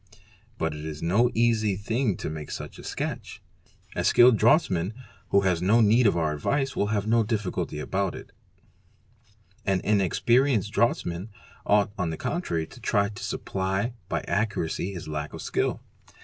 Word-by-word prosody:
But 80 -1 -1
it 75 0 -7
is 80 0 -6
no 105 +9 +3
easy 110 -3 +2
thing 110 +1 -1
to - - -4
make 75 -1 -7
such - - -7
a - - -10
sketch. - - -5 0.6
A - - -1
skilled 120 0 +6
draughtsman, 110 - +2 0.3
who 100 - +4
has 90 -3 +1
no 105 +6 +4
need 115 +2 +5
of 95 - +2
our 80 -2 +1
advice, 135 - -1
will 100 - +1
find 105 -1 -1
no 115 +1 +3
difficulty 105 -8 -2
about 95 +4 -2
it; - - -10 1.3
an 95 -2 +1
inexperi 120 +7 +3
enced 105 -1 -2
draughtsman 95 -4 0 0.4
ought 105 0 +3
on 90 -3 0
the 80 - -4
contrary 85 - -2
to - - -15
try 100 0 +1
to 100 - -9
supply 95 +5 -2 0.2
by - - -1
accuracy 100 -3 -1
his 85 -4 -7
lack 75 -1 -4
of - - -7
skill. - - -1
100 Hz, 165 wpm, -26 LUFS, 85-115 Hz, 1.3 s, skilled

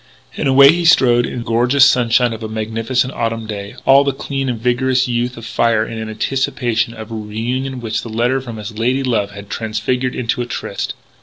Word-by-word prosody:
And - - -1
away 140 +1 +7
he 175 +1 -1
strode 125 -7 +4
in - - -6
the 120 - -4
gorgeous 125 +4 +4
sunshine 125 -2 +3
of 115 - -8
a 110 - -5
magnificent 115 +4 -1
autumn 115 -1 -2
day, 100 -2 -6
all 135 +1 +6
the 140 - +1
clean 135 0 -3
and 120 -3 -3
vigorous 125 +2 +1
youth 120 0 -1
of 115 - -9
him - - -7
afire 115 -2 +2
in 110 -1 -6
anticipation 115 0 -1
of 110 0 -9
a - - -4
reunion 120 +5 -4
which 110 -1 -2
the 115 - -8
letter 120 +4 0
from 120 -3 -8
his 105 +1 -7
lady 130 +4 +1
love 115 -6 0
had 100 0 -10
transfigured 125 +3 -2
into 120 0 -1
a 120 - -4
tryst. 120 - -4
120 Hz, 210 wpm, -17 LUFS, 110-130 Hz, -, away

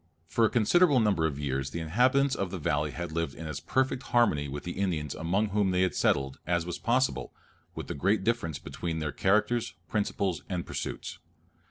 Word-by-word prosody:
For 115 +8 +2
a - - +3
considerable 140 - +4
number 100 -8 +2
of 70 -3 -4
years 70 -2 -2
the 85 - -4
inhabitants 130 - +3
of 95 -6 -2
the 95 - -4
valley 75 -2 0
had 85 +2 -5
lived 80 -3 -2
in 80 - -8
as 75 -2 -4
perfect 130 - 0
harmony 115 - +2
with 70 +1 -6
the 90 - -4
Indians 85 -7 -2
among 95 +6 0
whom 100 -1 +1
they 90 0 +2
had 90 -4 +1
settled, 70 -1 +1
as 85 -1 +1
was 90 - -4
possible, 120 - 0 0.4
with - - -5
the - - -4
great 95 +8 +1
difference 100 - 0
between 80 +3 -5
their 75 -2 -2
characters, 105 +7 +1
principles, 100 -4 -1
and 90 -3 -2
pursuits. - - -5
90 Hz, 195 wpm, -29 LUFS, 75-110 Hz, 0.4 s, considerable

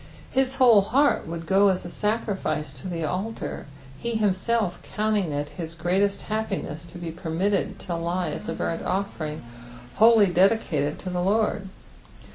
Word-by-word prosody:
His 265 0 +1
whole 240 -6 +7
heut 275 - +2
would 165 0 -5
go 195 +4 +4
as 185 -2 +1
a - - -4
gacriflce 200 -7 -2
to - - -6
the 170 -2 -3
altar, 190 +6 -4 0.3
he 235 +5 -2
himself 210 -2 0 0.2
countiag 210 -3 +1
it 145 0 -2
hit 160 +2 -6
greatest 190 +4 +1
happiness 195 -7 -3
to 170 +1 -10
be 170 -1 -5
permitted 180 +4 -1
to 180 - -4
lie 175 +2 -1
as - - -6
t, - - -2
burnt 165 - -2
oSering 165 -5 -3 0.6
wholly 225 -1 +7
dedicated 175 -6 +2
to 185 - -6
the 180 0 -1
Lord. 205 0 +1
190 Hz, 155 wpm, -25 LUFS, 170-215 Hz, 0.6 s, whole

